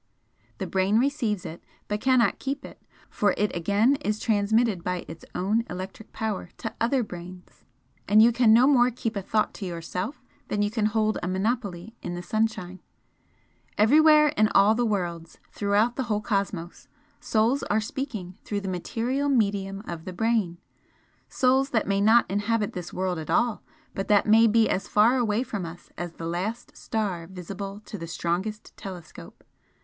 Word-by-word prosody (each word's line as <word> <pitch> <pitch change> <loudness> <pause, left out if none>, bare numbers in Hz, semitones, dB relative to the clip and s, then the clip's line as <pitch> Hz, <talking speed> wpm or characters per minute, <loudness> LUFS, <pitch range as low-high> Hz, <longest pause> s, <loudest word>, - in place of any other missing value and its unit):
The - - -3
brain 190 +3 +1
receives 235 -7 0
it, 165 - -8 0.2
but 210 0 -2
cannot 255 -3 +3
keep 275 +1 -4
it - - -12 0.3
for 205 -2 +1
it 210 0 0
again 205 +10 +2
is 215 -7 -2
transmitted 215 -2 +1
by 180 -1 -3
its 160 0 -10
own 210 +5 +1
electric 185 +4 -7
power 215 -5 -3
to 225 - -5
other 245 +2 +2
brains, 180 -2 -11 0.4
and 210 +1 +5
you 230 +2 +7
can 235 -1 +4
no 235 +3 +7
more 250 -3 +5
keep 230 -2 -4
a 200 - -2
thought 215 +3 0
to 200 - -7
yourself 180 - -5 0.2
than 205 0 0
you 205 - 0
can 215 -2 +1
hold 215 0 0
a - - -3
monopoly 200 0 -2
in 175 - -4
the 175 - -6
sunshine. 185 -2 -2 1.0
Everywhere 300 +7 +6
in 215 -7 +2
all 200 +2 +6
worlds, 180 -8 -2
throughout 210 +4 +1
the 265 - 0
whole 215 -3 0
cosmos, 195 -5 -3 0.3
Souls 230 +5 +1
are 210 - +3
speaking 215 -6 -5
through 205 -1 -3
the 195 - -6
material 240 +10 -1
medium 200 -5 0
of 165 -2 -6
the 185 - -6
brain, 215 -3 0 0.7
souls 265 +1 +2
that 225 -5 +1
may 200 0 +1
not 225 +3 +5
inhabit 205 +2 -1
this 180 -1 -6
world 185 -2 -2
at 155 - -8
all, 240 -2 +1 0.3
but 195 - -4
that 205 -1 +4
may 225 +2 +6
be 225 +1 +4
as 190 - -1
far 225 +5 +4
away 230 -1 +1
from 205 -7 -4
us 170 +1 -9
as 175 -1 -5
the 165 - -7
last 185 +8 -4
star 195 -7 -3
visible 195 +2 -7
to 210 - -7
the 165 - -6
strongest 180 +6 -3
telescope. 180 -5 -10
210 Hz, 170 wpm, -26 LUFS, 185-230 Hz, 1.0 s, you